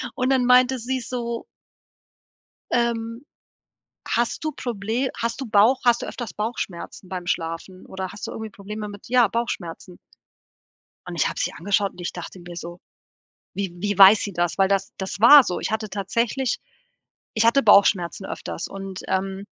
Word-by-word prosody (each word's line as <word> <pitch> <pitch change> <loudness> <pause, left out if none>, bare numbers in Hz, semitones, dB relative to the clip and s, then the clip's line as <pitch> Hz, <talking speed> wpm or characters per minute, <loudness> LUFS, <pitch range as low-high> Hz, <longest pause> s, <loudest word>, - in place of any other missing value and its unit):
und 255 +1 0
dann 260 -2 +3
meinte 250 +1 +5
sie 260 +3 -2
so 235 -1 -4 1.3
ähm: 235 +1 -1 0.8
„Hast 240 +7 0
du 310 - -1
Proble 235 +2 -2
hast 230 +2 -2
du 265 - -4
Bauch 220 +4 +4
hast 240 -1 +4
du - - -3
öfters 240 -4 -6
Bauchschmerzen 205 -4 -5
beim 180 -1 -5
Schlafen 170 +2 -4
oder 190 -1 -5
hast 205 - -7
du - - -6
irgendwie 220 -1 -6
Probleme 210 +1 -7
mit 205 -1 -11
ja, 245 -2 +4
Bauchschmerzen?“ 180 -6 -4 1.1
Und 175 -1 -6
ich 160 - +2
habe - - -6
sie - - -1
angeschaut 200 +3 0
und - - -13
ich 175 - -4
dachte 180 +1 -8
mir 175 0 -10
so: 175 +1 -7 0.8
„Wie 195 -3 -3
wie 205 +2 -2
weiß 200 +2 +9
sie 200 - -4
das?“ 175 -1 -1
Weil 195 -1 +4
das 195 0 0
das 190 -1 -5
war 275 +6 +9
so. 180 -7 -3
Ich - - -3
hatte 215 -1 -2
tatsächlich 230 +6 -1 0.8
ich 220 - +2
hatte 275 +4 +4
Bauchschmerzen 200 -3 +4
öfters - - -5
und, 195 -1 -7
ähm, 190 +1 -2
205 Hz, 170 wpm, -23 LUFS, 190-235 Hz, 1.3 s, weiß